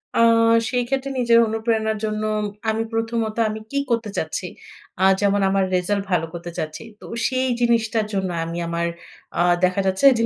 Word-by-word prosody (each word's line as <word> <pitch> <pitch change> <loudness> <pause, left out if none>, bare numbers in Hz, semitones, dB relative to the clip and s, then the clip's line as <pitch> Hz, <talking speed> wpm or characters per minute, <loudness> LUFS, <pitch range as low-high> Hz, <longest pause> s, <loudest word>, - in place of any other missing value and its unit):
আ - - +2 0.5
সেই 250 -1 0
ক্ষেত্রে 270 +1 -1
নিজের 235 -1 +5
অনুপ্রেরণার 220 -1 0
জন্য, 215 0 -2 0.5
আমি 220 +1 0
প্রথমত 225 -1 -1
আমি 215 0 -4
কী 280 - 0
করতে 230 -2 0
চাচ্ছি? 160 +3 -2 0.5
আ - - +3 0.2
যেমন 200 0 +2
আমার 195 0 +2
রিজাল্ট 195 +2 0
ভালো 165 -2 +2
করতে 170 0 -6
চাচ্ছি। 155 +6 -4 0.2
তো - - -12 0.2
সেই 260 0 0
জিনিসটার 230 -2 +2
জন্য 190 -2 -1 0.2
আমি 170 +1 -5
আমার 170 0 -1 0.5
আ - - +4 0.2
দেখা 185 +2 +3
যাচ্ছে 190 +7 +1
যে 230 - +1
215 Hz, 170 wpm, -22 LUFS, 190-230 Hz, 0.5 s, নিজের